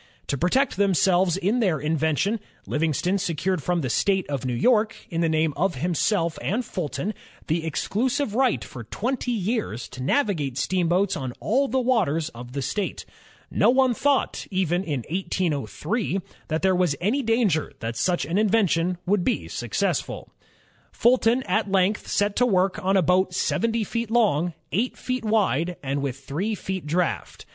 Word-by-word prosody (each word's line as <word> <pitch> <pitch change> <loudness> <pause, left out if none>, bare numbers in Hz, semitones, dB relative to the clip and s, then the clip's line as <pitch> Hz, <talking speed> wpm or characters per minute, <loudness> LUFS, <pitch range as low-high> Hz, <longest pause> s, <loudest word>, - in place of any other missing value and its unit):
To - - +1
protect 180 - +1
themselves 190 -2 +3
in 200 +6 +1
their 185 - +1
invention, 160 +8 0 0.3
Livingston 165 +5 0
secured 180 0 -1
from 175 +3 0
the 130 - -2
State 190 +4 +1
of 135 -2 -2
New 125 -1 -1
York, 220 - +3 0.2
in 165 0 -1
the 165 - +2
name 160 -1 +1
of 180 +1 0
himself 170 - 0
and 230 +6 -1
Fulton, 185 +4 -3 0.3
the 160 +1 0
exclusive 230 - -1
right 260 +2 +2
for 120 - -9
twenty 245 - -3
years 210 - -2
to 130 - -9
navigate 150 - 0
steamboats 185 +4 +1
on 130 -6 -4
all 270 +6 +1
the 265 +2 +1
waters 185 - +1
of 120 -1 -10
the 140 -1 -2
state. 190 +9 -3 0.5
No - - +4
one 260 0 +4
thought, 280 +3 0
even 185 -2 0
in 145 -8 -2
1803, 175 - -1 0.3
that 160 +2 -2
there 190 -1 +4
was 180 -5 +2
any 220 +10 +1
danger 225 - +1
that 115 +1 -4
such 175 +4 0
an 170 +7 0
in 215 -1 +3
vention 180 -4 +2
would 195 0 +2
be 250 - 0
a - - -11
success. - - 0 0.9
Fulton 240 +1 +3
at 215 -4 0
length 195 +2 +2
set 205 0 +1
to 250 - +4
work 195 0 +1
on 195 +1 +3
a 185 - +3
boat 180 +2 +2
seventy 230 +3 0
feet 230 +2 -3
long, 180 -8 +2 0.2
eight 230 +7 0
feet 255 -2 -3
wide, 180 -6 +1
and 140 +1 -1
with 140 -1 -4
three 185 +12 -2
feet 190 -5 -5
draft. 165 - -2
185 Hz, 170 wpm, -24 LUFS, 160-220 Hz, 0.9 s, No